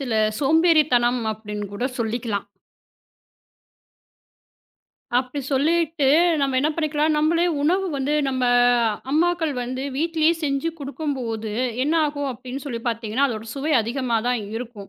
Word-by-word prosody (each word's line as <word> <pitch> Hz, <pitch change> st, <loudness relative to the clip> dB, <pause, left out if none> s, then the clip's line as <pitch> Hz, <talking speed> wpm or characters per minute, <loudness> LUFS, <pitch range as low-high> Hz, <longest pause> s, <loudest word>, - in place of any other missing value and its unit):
சில 255 Hz, -4 st, -3 dB, 0.3 s
சோம்பேறித்தனம் 290 Hz, -6 st, +3 dB
அப்படின்னு 210 Hz, -1 st, -6 dB
கூட 240 Hz, -, -3 dB
சொல்லிக்கலாம். 225 Hz, -3 st, -2 dB, 2.7 s
அப்படி 255 Hz, +3 st, -3 dB
சொல்லிட்டு, 315 Hz, +1 st, +1 dB, 0.3 s
நம்ம 270 Hz, -2 st, +1 dB
என்ன 295 Hz, -, +2 dB
பண்ணிக்கலாம், 310 Hz, -1 st, +1 dB
நம்மளே 330 Hz, +3 st, +2 dB, 0.2 s
உணவு 370 Hz, +5 st, +2 dB
வந்து, 280 Hz, +2 st, -1 dB
நம்ம 260 Hz, -1 st, -1 dB, 0.7 s
அம்மாக்கள் 330 Hz, +1 st, +1 dB
வந்து 255 Hz, +2 st, -4 dB
வீட்டிலேயே 325 Hz, +1 st, +2 dB
செஞ்சு 275 Hz, +2 st, 0 dB
கொடுக்கும்போது, 265 Hz, -7 st, -4 dB, 0.3 s
என்ன 300 Hz, +4 st, +1 dB
ஆகும் 285 Hz, -2 st, -3 dB
அப்படின்னு 255 Hz, +2 st, -7 dB
சொல்லி 240 Hz, -5 st, -4 dB
பார்த்தீங்கன்னா, 230 Hz, +3 st, 0 dB
அதோட 225 Hz, -2 st, -5 dB
சுவை 290 Hz, +3 st, -1 dB
அதிகமா 240 Hz, +1 st, -1 dB
தான் 250 Hz, -2 st, 0 dB, 0.2 s
இருக்கும். 225 Hz, -4 st, -8 dB
270 Hz, 115 wpm, -23 LUFS, 240-310 Hz, 2.7 s, சோம்பேறித்தனம்